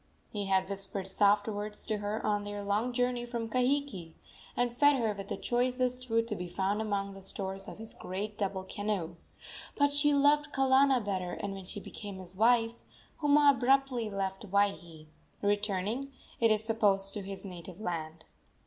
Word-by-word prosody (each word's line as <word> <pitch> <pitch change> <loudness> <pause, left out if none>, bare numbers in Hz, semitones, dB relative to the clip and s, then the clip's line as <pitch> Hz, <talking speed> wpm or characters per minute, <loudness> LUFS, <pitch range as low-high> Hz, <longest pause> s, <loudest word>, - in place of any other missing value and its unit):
He 205 -3 -3
had 190 -1 +2
whispered 195 -1 -4
soft 205 +2 +3
words 210 0 -4
to 215 -2 -1
her 205 +1 -3
on 205 -1 +1
their 205 0 -5
long 210 +5 0
journey 245 0 0
from 235 -1 -3
Kahiki, 250 - 0 0.4
and 245 -1 +1
fed 285 +2 +5
her 225 -5 +1
with 200 -1 -7
the - - -3
choicest 250 +1 0
food 230 0 +1
to 210 - -1
be 180 -2 -5
found 195 +4 0
among 200 -2 -2
the 195 - -11
stores 195 0 -3
of - - -8
his 220 +1 -7
great 205 +3 -5
double 195 -2 -2
canoe; 190 -4 -3 0.6
but 285 0 +3
she 290 +1 +4
loved 290 +1 +4
Kalana 265 -2 +4
better, 185 -3 -2
and, 200 -1 -4
when 195 -1 -8
she 205 - -5
became 205 -1 -8
his 185 0 -9
wife, 230 +2 +4 0.5
Huma 290 -1 +6
abruptly 265 -3 +2
left 195 0 -3
Waihee, 180 -5 0 0.4
returning, 205 +5 0 0.3
it 230 - +5
is 215 0 +2
supposed, 205 -3 +1
to 210 - -4
his 195 0 -7
native 180 0 -8
land. 160 -5 -4
205 Hz, 175 wpm, -31 LUFS, 195-245 Hz, 0.6 s, Huma